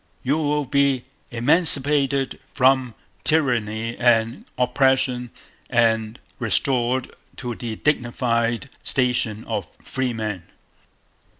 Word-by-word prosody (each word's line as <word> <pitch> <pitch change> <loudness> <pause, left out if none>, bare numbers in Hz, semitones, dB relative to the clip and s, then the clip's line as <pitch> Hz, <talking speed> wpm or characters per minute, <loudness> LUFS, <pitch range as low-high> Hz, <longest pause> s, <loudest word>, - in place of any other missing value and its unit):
You 140 +4 +1
will 150 -1 0
be 140 -1 +2 0.3
emancipated 140 0 +2 0.2
from 130 -3 +3 0.3
Tyranny 115 -7 +1
and 115 -1 +2
Oppression 125 -1 +1 0.4
and 115 -1 +1 0.2
restored 125 +1 0 0.3
to 125 -2 -4
the 115 -1 -5
dignified 120 -2 0 0.2
station 120 -4 0
of 105 -6 -3
Freemen... 110 -7 -3
125 Hz, 85 wpm, -22 LUFS, 115-135 Hz, 0.4 s, from